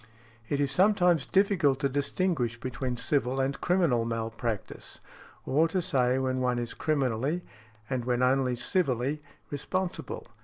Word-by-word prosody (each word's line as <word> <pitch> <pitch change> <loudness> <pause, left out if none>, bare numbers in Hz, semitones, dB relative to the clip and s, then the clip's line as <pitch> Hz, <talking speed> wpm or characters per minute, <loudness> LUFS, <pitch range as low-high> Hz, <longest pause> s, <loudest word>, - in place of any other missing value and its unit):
It 145 - 0
is 140 -1 +1
sometimes 180 -3 +3
difficult 185 -9 +3
to 140 - +3
distinguish 140 -3 -1
between 125 0 -3
civil 135 0 +1
and 135 +1 -1
criminal 170 -10 +2
malpractice, 115 -1 -4 0.5
or 155 +5 +3
to 185 +3 -1
say 130 -8 +2
when 130 -1 0
one 125 -1 +1
is 120 -1 -3
criminally, 140 +2 0 0.4
and 130 -1 -2
when 125 0 +1
only 130 -1 +2
civilly 140 - 0 0.3
responsible. 185 +6 -3
135 Hz, 130 wpm, -28 LUFS, 125-165 Hz, 0.5 s, sometimes